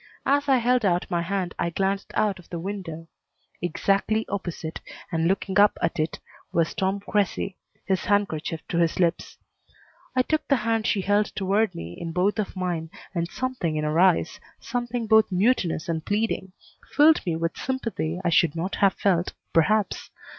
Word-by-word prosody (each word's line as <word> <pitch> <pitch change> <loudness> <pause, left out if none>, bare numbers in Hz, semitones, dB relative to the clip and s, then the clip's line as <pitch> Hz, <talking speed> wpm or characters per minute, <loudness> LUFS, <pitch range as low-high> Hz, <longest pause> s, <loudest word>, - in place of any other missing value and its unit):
As 285 +1 +2
I 265 - +6
held 245 0 +2
out 180 -3 +2
my 170 -1 +1
hand 185 0 -2
I 170 - +1
glanced 195 +3 -1
out 205 -3 +1
of 175 - -16
the 175 - -4
window. 165 -3 -6 0.5
Exactly 195 +5 +1
opposite, 175 -5 -4 0.3
and 165 -1 +1
looking 195 +1 +1
up 205 0 +5
at 165 -1 -1
it, 155 +1 -1 0.3
was 165 -1 +1
Tom 195 +1 -1
Cressy, 200 -1 -1 0.3
his 190 -2 0
handkerchief 175 -6 0
to 170 - 0
his 170 0 +1
lips. 170 -1 0 0.8
I 255 - +4
took 310 +3 -1
the 280 - +4
hand 225 -1 +1
she 200 - +1
held 205 +2 +2
toward 200 +1 +1
me 85 +1 -7
in 165 -1 -4
both 190 +5 +1
of 205 - -2
mine 175 -3 -2 0.2
and 170 -2 -1
something 225 -7 -2
in 150 - -1
her 150 +2 +1
eyes, 180 -2 +3 0.2
something 240 0 -3
both 220 -1 +4
mutinous 185 -4 +1
and 160 -2 -2
pleading, 205 -2 -1 0.4
filled 305 +2 +6
me 170 -4 -1
with 165 +1 -2
sympathy 230 -10 -3
I - - +3
should 165 -1 +3
not 175 +4 -3
have 195 -1 +3
felt, 180 -3 +1 0.2
perhaps. 205 +5 +2
190 Hz, 175 wpm, -25 LUFS, 170-215 Hz, 0.8 s, I